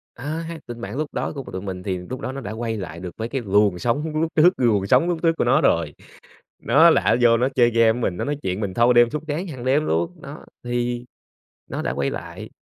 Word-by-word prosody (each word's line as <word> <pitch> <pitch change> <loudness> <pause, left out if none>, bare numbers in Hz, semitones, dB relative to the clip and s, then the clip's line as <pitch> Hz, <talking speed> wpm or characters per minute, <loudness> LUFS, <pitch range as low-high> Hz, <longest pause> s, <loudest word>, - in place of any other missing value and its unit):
Ơ 150 +6 -4
ha, 165 0 -7
tình 120 -1 -8
bạn 110 +3 -6
lúc 155 -1 -3
đó - - -2
của 140 - -4
t - - -11
tụi 95 - -4
mình 95 -2 -6
thì 95 -2 -2
lúc 105 +9 -7
đó 130 - -4
nó 135 +1 -6
đã 105 - -6
quay 115 0 -3
lại 85 -4 -7
được 90 -1 -6
mấy 115 +1 -4
cái 135 +1 -2
luồng 100 -2 +2
sóng 150 - -1
lúc 165 0 -1
trước, 175 +4 +6
luồng 110 -6 +2
sóng 170 - +4
lúc 170 -2 -1
trước 165 -1 +4
của - - +1
nó 135 +6 +3
rồi. 80 -3 +1 0.7
Nó - - +6
là - - +4
á - - +3
vô 115 -1 +6
nó 125 +3 +1
chơi 120 -2 +4
game 115 -1 +4
mình, 95 -6 -1
nó - - -3
nói 145 0 -2
chuyện 95 +2 -2
mình 100 -3 -3
thâu 120 +1 +4
đêm 120 -1 +5
suốt 150 0 -4
sáng 155 +6 -2
hằng 130 -8 -8
đêm 140 +4 +2
luôn, 80 +1 0
đó, - - -10 0.2
thì 120 0 -2 0.7
nó - - -3
đã 60 - -2
quay 70 0 -1
lại. - - -7
120 Hz, 265 wpm, -22 LUFS, 100-140 Hz, 0.7 s, trước